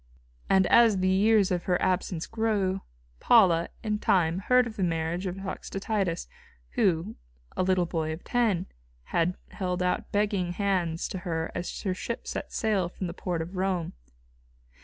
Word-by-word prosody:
And 190 -1 +5
as 230 -2 +5
the 185 0 +1
years 200 +1 +4
of 175 -1 -1
her 180 -1 +1
absence 180 -2 0
grew, 205 -4 0 0.4
Paula, 175 -8 +5
in 210 -1 -1
time, 175 -3 +2
heard 250 +5 +4
of 225 -2 -7
the - - -4
marriage 170 +1 -1
of 180 - -3
Toxotius, 195 -1 -3 0.4
who, 195 -4 0 0.4
a - - 0
little 185 -1 +2
boy 160 -2 -2
of 160 +2 -7
ten, 220 -8 +1 0.5
had 170 +2 +1
held 180 -2 -2
out 180 - -1
begging 200 -4 0
hands 180 -4 0
to 190 - -4
her 165 -2 -3
as 175 - -5
her 190 -3 0
ship 230 +5 -5
set - - -4
sail 200 -6 0
from 185 - -6
the 170 - -4
port 175 -3 -3
of 175 +4 -9
Rome. 185 -3 -1
185 Hz, 160 wpm, -28 LUFS, 175-205 Hz, 0.5 s, And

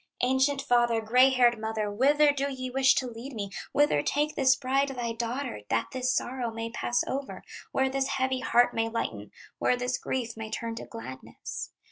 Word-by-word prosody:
"Ancient 265 +2 +2
father, 240 -3 +3
gray 250 +4 +5
haired 245 -3 +3
mother, 220 -1 -2
Whither 290 +7 +4
do 280 0 -1
ye 255 -1 -5
wish 265 +1 +4
to 260 - 0
lead 240 +4 -8
me, 200 -3 -5 0.2
Whither 290 - +3
take 295 - 0
this 260 -3 +4
bride, 275 +1 +1
thy 245 -4 -3
daughter, 235 - -4
That 115 - 0
this 255 0 0
sorrow 245 -1 -1
may 225 0 -5
pass 240 +1 0
over, 270 0 -5 0.3
Where 265 0 +2
this 270 0 -1
heavy 260 -1 0
heart 245 -1 +3
may 225 0 0
lighten, 105 - -4 0.3
Where 250 - +2
this 250 0 -2
grief 235 -4 -3
may 220 -1 -6
turn 230 +1 -4
to - - -6
gladness? 130 - -8
250 Hz, 185 wpm, -28 LUFS, 230-265 Hz, 0.3 s, gray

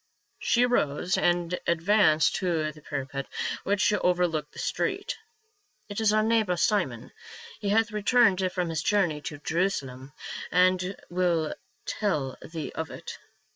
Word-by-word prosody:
She 240 +1 +3
arose 180 -6 +1
and 175 0 +1
advanced 170 -1 +3
to 165 -4 0
the 155 0 -16
parapet 140 -1 -4 0.4
which 200 +1 +2
over 180 -3 +2
looked 155 -3 -4
the - - -15
street. - - -2 0.4
" 410 - -42
It 205 +2 -3
is 215 -1 +4
our 215 0 +3
neighbor, 220 -5 +2
Simon; 170 - 0 0.5
he 200 - -2
hath 225 +2 +3
returned 210 -3 +3
from 180 -2 -1
his 160 -2 -1
journey 175 -4 +1
to 145 - -6
Jerusalem 140 -5 -2 0.4
and 185 +2 +3 0.2
will 175 -3 +1 0.3
tell 150 -11 -1
thee 160 -2 -6
of 160 - -4
it. - - -8
180 Hz, 140 wpm, -27 LUFS, 155-205 Hz, 0.5 s, is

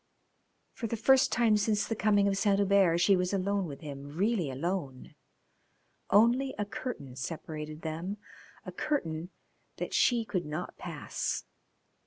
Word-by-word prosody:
For 230 - -4
the 230 - -3
first 265 +5 +4
time 225 -3 +4
since 210 0 +1
the 225 - -1
coming 205 -2 +3
of 195 - +1
Saint 200 0 +2
Hubert 195 -4 +4
she 195 +3 +5
was 180 +1 0
alone 195 0 0
with 140 0 -8
him, 145 0 -8
really 200 -5 +1
alone. 140 -1 -4 1.0
Only 240 +6 +4
a 205 - -1
curtain 145 - -6
separated 155 +3 -6
them, 165 +6 -4 0.5
a - - -6
curtain 170 - -2 0.5
that - - -4
she 235 -2 +3
could 185 -7 -2
not 150 +1 -5
pass. - - -4
195 Hz, 145 wpm, -30 LUFS, 160-215 Hz, 1.0 s, she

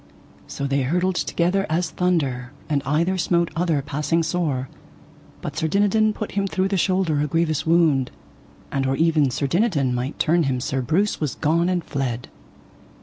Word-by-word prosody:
So 140 - -4
they 140 0 +1
hurtled 180 +8 +1
together 180 +3 0
as 170 +2 0
thunder, 140 -8 -1
and 145 -2 0
either 170 +6 +1
smote 170 -1 +1
other 165 -4 0
passing 150 +4 0
sore, 155 -6 -1 0.8
but - - -5
Sir 160 - 0
Dinadan 205 +4 +3
put 215 0 -5
him 200 0 0
through 190 0 0
the 195 - 0
shoulder 185 -5 +1
a 150 - 0
grievous 160 0 0
wound, 160 -6 +3 0.6
and 135 -1 0
or 135 0 0
ever 160 -4 +3
Sir 135 +3 -2
Dinadan 145 - +1
might 125 +4 -3
turn 170 +2 +2
him 130 -2 0
Sir 135 +1 -2
Breuse 175 - 0
was 150 -4 -1
gone 170 +3 +1
and 180 -2 0
fled. 130 -5 -3
160 Hz, 170 wpm, -22 LUFS, 140-180 Hz, 0.8 s, Dinadan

